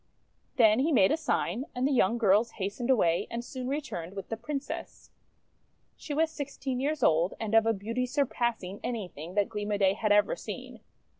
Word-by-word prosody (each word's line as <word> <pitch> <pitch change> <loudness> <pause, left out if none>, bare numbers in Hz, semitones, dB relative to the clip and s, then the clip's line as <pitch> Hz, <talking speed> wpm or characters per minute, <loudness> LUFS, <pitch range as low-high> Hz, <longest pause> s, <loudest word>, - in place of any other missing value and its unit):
Then 220 -3 +5
he 300 +5 +2
made 195 -9 +5
a - - +4
sign, 270 - -1
and 250 +2 +1
the - - 0
young 235 -3 +3
girls 220 +1 +3
has 200 0 -3
tened 240 +1 -2
away, 175 -10 +3
and 235 +1 -4
soon 255 -1 -6
returned 205 - -4
with 195 -2 -7
the 225 - -2
Princess. 280 +4 -6 0.8
She 310 - -9
was 320 +1 +2
sixteen 275 -3 -4
years 290 0 -1
old, 165 +1 +3
and 220 -1 -3
of 225 0 +5
a - - +5
beauty 230 +5 -2
sur 280 +3 +1
passing 225 -7 -2
anything 185 -7 -5
that 205 -1 +2
Gleam 210 -2 -4
o' 205 - +1
Day 195 -1 +3
had 215 +1 -1
ever 205 - +4
seen. - - -8
230 Hz, 200 wpm, -29 LUFS, 200-265 Hz, 0.8 s, Then